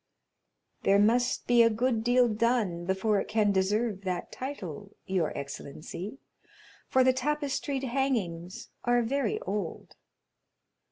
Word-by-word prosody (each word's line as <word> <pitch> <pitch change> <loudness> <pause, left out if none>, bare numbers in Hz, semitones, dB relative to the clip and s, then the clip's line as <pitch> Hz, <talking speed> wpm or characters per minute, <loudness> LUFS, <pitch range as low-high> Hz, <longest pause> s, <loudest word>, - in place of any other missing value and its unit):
"There 195 - +4
must 235 +4 +2
be 240 -1 +5
a 230 - +6
good 230 0 0
deal 245 +1 +4
done 215 -6 0
before 190 +3 +1
it - - -3
can 215 -2 +2
deserve 200 +2 0
that 185 -2 -3
title, 205 - -7
your 185 -5 0
excellency, 155 - -7 0.7
for 260 - +4
the 260 0 +4
tapestried 280 0 -1
hangings 225 -10 -2
are 240 0 +3
very 255 -1 0
old." 195 -4 -4
220 Hz, 120 wpm, -29 LUFS, 190-250 Hz, 0.7 s, a